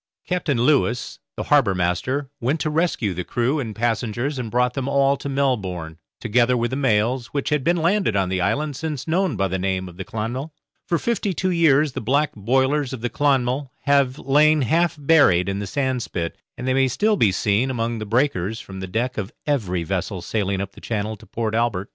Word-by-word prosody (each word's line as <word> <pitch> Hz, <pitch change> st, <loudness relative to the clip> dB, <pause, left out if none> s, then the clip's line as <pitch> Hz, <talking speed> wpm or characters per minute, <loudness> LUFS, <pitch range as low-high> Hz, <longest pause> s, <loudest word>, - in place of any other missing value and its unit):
Captain 175 Hz, -7 st, 0 dB
Lewis, 125 Hz, -2 st, +1 dB, 0.2 s
the -, -, -2 dB
harbour 135 Hz, -10 st, +3 dB
master, 95 Hz, -, -1 dB
went 135 Hz, +7 st, 0 dB
to 155 Hz, -, -1 dB
rescue 150 Hz, -, 0 dB
the 90 Hz, +1 st, -4 dB
crew 125 Hz, -, 0 dB
and 110 Hz, -6 st, -4 dB
passengers 120 Hz, +4 st, -1 dB
and 120 Hz, -3 st, -4 dB
brought 125 Hz, +2 st, +1 dB
them 135 Hz, 0 st, -3 dB
all 140 Hz, 0 st, +3 dB
to 140 Hz, -, -6 dB
Melbourne, 95 Hz, -, -1 dB, 0.2 s
together 120 Hz, +2 st, +2 dB
with 120 Hz, +1 st, -1 dB
the -, -, -1 dB
mails, 125 Hz, -1 st, +1 dB
which 140 Hz, -2 st, -2 dB
had 150 Hz, -2 st, +1 dB
been 175 Hz, +4 st, +2 dB
landed 175 Hz, -, +1 dB
on 95 Hz, -2 st, +2 dB
the 90 Hz, 0 st, -1 dB
island 140 Hz, +10 st, 0 dB
since 150 Hz, -1 st, -4 dB
known 175 Hz, -3 st, +1 dB
by 95 Hz, -1 st, +1 dB
the 95 Hz, 0 st, -2 dB
name 95 Hz, 0 st, -1 dB
of 90 Hz, -1 st, -12 dB
the 95 Hz, -, -4 dB
'Clonmel'. 120 Hz, -, -4 dB, 0.4 s
For 170 Hz, -, +2 dB
fifty 205 Hz, -2 st, -1 dB
two 185 Hz, +3 st, 0 dB
years 155 Hz, -4 st, +4 dB
the -, -, -5 dB
black 140 Hz, +6 st, +1 dB
boilers 130 Hz, +6 st, +1 dB
of 125 Hz, -, -6 dB
the 120 Hz, -, -2 dB
'Clonmel' 135 Hz, -1 st, +1 dB
have 140 Hz, -2 st, +2 dB
lain 150 Hz, +1 st, +3 dB
half 165 Hz, +5 st, +1 dB
buried 140 Hz, -, +4 dB
in 100 Hz, 0 st, -2 dB
the 100 Hz, -, -4 dB
sandspit, 125 Hz, -9 st, -2 dB, 0.3 s
and 125 Hz, -, -5 dB
they 130 Hz, -, +2 dB
may 135 Hz, 0 st, +3 dB
still 210 Hz, -, +1 dB
be 110 Hz, -, +3 dB
seen 105 Hz, +6 st, +1 dB
among 115 Hz, -2 st, -2 dB
the 110 Hz, -, -4 dB
breakers 110 Hz, -3 st, 0 dB
from 95 Hz, -4 st, -9 dB
the 95 Hz, -, -5 dB
deck 120 Hz, +5 st, -2 dB
of 100 Hz, -1 st, -4 dB
every 100 Hz, -, 0 dB
vessel 95 Hz, +1 st, -3 dB
sailing 100 Hz, -2 st, -1 dB
up 100 Hz, 0 st, -5 dB
the -, -, -15 dB
channel 110 Hz, -1 st, -3 dB
to 110 Hz, +1 st, -17 dB
Port 110 Hz, -2 st, -3 dB
Albert. 110 Hz, -4 st, 0 dB
125 Hz, 210 wpm, -22 LUFS, 105-145 Hz, 0.4 s, years